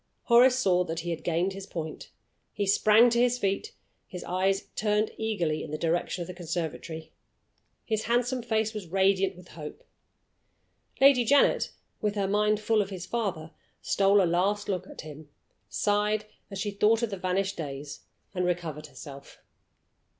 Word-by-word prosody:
Horace 245 +2 +6
saw 180 -7 +3
that 165 0 -3
he 175 +1 -4
had 165 - -5
gained 175 +3 0
his 195 0 -8
point. 160 -4 -6 0.4
He 205 - -1
sprang 215 +4 +5
to 235 - +2
his 245 0 +3
feet; 200 - -2 0.3
his 180 -2 -7
eyes 190 +2 0
turned 210 0 +1
eagerly 175 -9 -1
in - - -7
the 155 - -3
direction 170 +2 -1
of - - -10
the 180 - -6
conservatory; 165 -2 -5 0.7
his 220 -1 -1
handsome 245 +2 +1
face 220 -1 0
was 210 -5 -6
radiant 190 +1 +2
with 180 -1 -14
hope. 150 -2 -9 1.2
Lady 270 -2 +6
Janet 280 +5 +3 0.3
(with 210 -1 0
her 200 -2 0
mind 210 +1 +2
full 215 0 +2
of 195 - -3
his 185 -3 -6
father) 185 -9 -3 0.3
stole 200 0 +4
a - - +3
last 190 +5 +1
look 190 -4 -2
at - - -9
him, 155 -1 -11 0.4
sighed 210 +1 +1 0.2
as 195 - -6
she 205 +2 -2
thought 215 +3 +3
of 230 - -1
the 195 - -3
vanished 190 +2 -1
days, 140 -2 -6 0.3
and 180 -2 -1
recovered 165 -4 -2
herself. 140 0 -12
195 Hz, 165 wpm, -28 LUFS, 170-215 Hz, 1.2 s, Horace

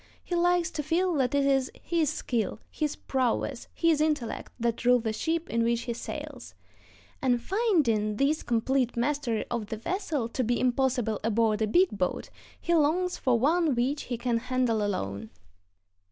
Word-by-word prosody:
He - - -6
likes 350 0 +2
to 305 - -3
feel 350 +5 +1
that 260 0 +1
it 280 -1 +3
is 270 -1 +2
his 330 -4 0
skill, 235 -9 -2
his 300 -2 -2
prowess, 255 0 -1
his 330 -3 +2
intellect, 300 -7 -1
that 235 0 -1
rule 250 +1 +5
the 225 -2 -2
ship 325 +8 -1
in 230 0 0
which 235 0 +1
he 235 0 -3
sails; 230 - -7 0.7
and 245 -2 +2
finding 255 - +1
this 285 +6 +1
complete 245 +1 0
mastery 245 -3 0
of 235 -3 -2
the 220 - -4
vessel 305 - -2
to 255 - -1
be 240 +1 0
impossible 250 -4 +1
aboard 220 -1 +1
a 215 - +2
big 360 - +4
boat, 185 -2 -2 0.3
he 340 - -1
longs 340 +4 +2
for 255 -3 +2
one 310 +3 +2
which 265 +5 -1
he 240 - -3
can 240 0 0
handle 250 -3 0
alone. 105 - -3
255 Hz, 170 wpm, -28 LUFS, 230-305 Hz, 0.7 s, rule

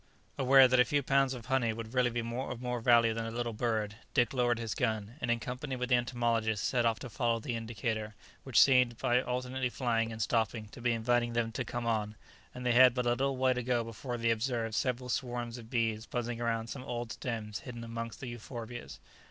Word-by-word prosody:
Aware 135 0 +7
that 130 0 +3
a - - +8
few 140 +4 0
pounds 135 0 +2
of 120 -3 -9
honey 125 -4 +1
would 115 +1 -7
really 125 -1 +3
be 120 0 -2
of 120 +1 -4
more 125 -1 -2
value 115 -1 +5
than 115 0 -3
a - - -3
little 120 0 -3
bird, 110 -2 -1 0.2
Dick 120 -2 +3
lowered 120 -2 +2
his 115 -3 -3
gun, 110 -2 -1
and 120 - -2
in 120 0 +2
company 125 +4 -4
with 125 0 -3
the 125 - +5
entomologist 115 -3 0
set 120 -3 +2
off 115 -1 +1
to 130 - -7
follow 115 -1 0
the 115 +1 -3
indicator, 110 -1 -3 0.3
which 130 -4 +3
seemed, 125 -3 +5
by 125 -1 +2
alternately 125 +1 -2
flying 115 -2 0
and 110 - -7
stopping, 110 -1 0
to 120 - -12
be 120 0 +2
inviting 120 +1 +1
them 115 -1 0
to 120 +4 -3
come 120 -1 -4
on, 110 -2 -1 0.4
and 125 0 -6
they 125 - +3
had 125 0 +7
but 125 -1 0
a - - +3
little 135 +2 0
way 130 0 +3
to 125 - -2
go 120 -1 0
before 120 +2 -5
they 115 0 +2
observed 115 -1 -1
several 125 +2 -1
swarms 120 -2 -3
of 115 -1 -12
bees 115 -2 -1
buzzing 120 -1 -3
around 115 -1 0
some 125 +3 -7
old 120 -2 -4
stems 110 -4 -4
hidden 120 -3 -8
amongst 115 -1 -6
the - - -5
euphorbias. 120 0 -7
120 Hz, 225 wpm, -31 LUFS, 115-125 Hz, 0.4 s, a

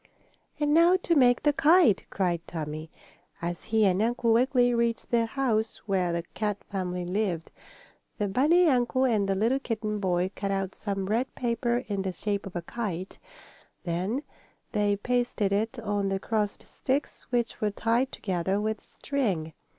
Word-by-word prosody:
"And 295 0 +2
now 340 +3 +6
to 340 - +2
make 250 -5 +4
the 295 - +4
kite!" 300 - +5
cried 175 -3 0
Tommie, 155 -1 -5 0.5
as 170 0 -4
he 220 -1 +3
and 190 0 +3
Uncle 235 0 +2
Wiggily 245 0 +3
reached 235 -1 0
the 230 -1 +3
house 225 -4 0
where 185 -4 +1
the 170 0 -2
Kat 210 -2 -2
family 180 -2 -3
lived. 180 -3 -2 0.7
The 210 - 0
bunny 310 - +4
uncle 255 -1 +2
and 210 -6 +1
the 195 - +2
little 230 +7 +2
kitten 215 -4 -3
boy 185 -1 0
cut 200 - -3
out 195 -1 -1
some 195 -2 -3
red 230 +6 -1
paper 240 0 0
in 200 -2 -1
the 190 -1 -2
shape 200 +2 -2
of 190 - -10
a 175 - -3
kite. 190 -3 -5 0.6
Then 185 - -2 0.5
they 205 -1 +2
pasted 240 -2 0
it 220 +4 0
on 205 -3 -1
the 195 - 0
crossed 210 -1 -2
sticks, 275 +3 -3
which 240 -2 -1
were 210 - +2
tied 230 +5 0
together 190 0 -1
with 215 0 -2
string. 195 - -2
215 Hz, 165 wpm, -28 LUFS, 190-245 Hz, 0.7 s, now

